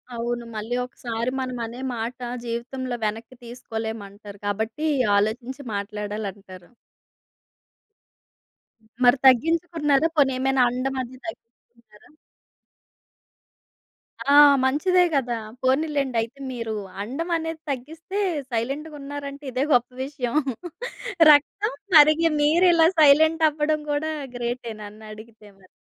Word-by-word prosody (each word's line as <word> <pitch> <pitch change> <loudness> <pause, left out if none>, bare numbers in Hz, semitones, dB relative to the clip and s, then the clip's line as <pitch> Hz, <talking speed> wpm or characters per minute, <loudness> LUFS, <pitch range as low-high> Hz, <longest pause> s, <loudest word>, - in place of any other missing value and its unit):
అవును. 240 +1 -3
మళ్ళీ 220 +3 -3
ఒకసారి 235 -1 -4
మనమనే 245 -2 -4 0.2
మాట 235 +3 -5 0.3
జీవితంలో 245 +2 -4
వెనక్కి 225 +4 -4
తీసుకోలేమంటారు. 220 -4 -7
కాబట్టి 220 +9 -2 0.3
ఆలోచించి 240 +6 -2
మాట్లాడాలంటారు. 200 -3 -6 2.1
హ్మ్. 220 - -28
మరి 245 +2 +6
తగ్గించుకున్నారా? 315 +2 +3
పోనీ 270 -3 +4
ఏమైనా 265 0 +2
అండం 260 +2 -2
అది 255 +1 -8
తగ్గిచుకున్నారా? 235 -3 -13 2.2
ఆ! - - +7 0.3
మంచిదే 360 +8 +3
గదా! 245 -4 0 0.3
పోనీలేండి 275 -1 +1
అయితే 230 +5 -7
మీరు 230 -3 -4 0.3
అండం 275 - -4
అనేది 325 -1 -5
తగ్గిస్తే 320 +9 -5 0.3
సైలెంటు‌గున్నారంటే 280 +3 -5
ఇదే 255 +2 0
గొప్ప 245 0 +3
విషయం. 265 -3 -4 1.0
రక్తం 395 +10 +2 0.2
మరిగి 310 +2 +7
మీరిలా 330 +2 +5
సైలెంట్ 315 +2 +5
అవ్వడం 305 0 -1
గూడా 300 +2 -1 0.2
గ్రేటే 240 -1 -4
నన్నడిగితే 215 +1 -12
మరి. 185 - -21
255 Hz, 95 wpm, -24 LUFS, 225-295 Hz, 2.2 s, ఆ